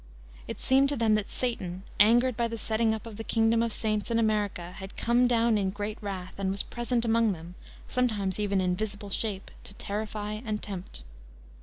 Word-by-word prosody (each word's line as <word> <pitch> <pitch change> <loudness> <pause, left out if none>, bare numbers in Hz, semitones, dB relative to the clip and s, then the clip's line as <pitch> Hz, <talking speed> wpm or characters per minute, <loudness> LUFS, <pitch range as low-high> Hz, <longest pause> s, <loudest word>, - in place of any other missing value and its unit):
It - - -5
seemed 270 +1 +4
to 285 - 0
them 225 -3 +3
that 215 -1 +1
Satan, 190 -7 -3 0.2
angered 240 +4 +5
by 235 0 +1
the 230 0 -4
setting 220 +1 +1
up 220 0 -3
of 220 -3 -8
the 225 - -4
kingdom 225 0 +3
of 230 - +1
the - - -4
saints 215 -1 0
in 230 - +2
America, 210 -6 0
had 190 +1 -9
"come 240 +1 +3
down 230 -2 +3
in 195 -1 +1
great 205 +2 -4
wrath," 195 -2 -5
and 195 -1 0
was 195 +1 -1
present 240 0 -1
among 225 -2 +3
them, 170 0 -9 0.3
sometimes 215 -7 0
even 200 -2 +1
in 180 -1 +1
visible 205 0 -4
shape, 200 -2 -2
to 200 - -8
terrify 210 +1 -3
and 215 -3 -3
tempt. 185 - -6
215 Hz, 200 wpm, -29 LUFS, 200-230 Hz, 0.3 s, angered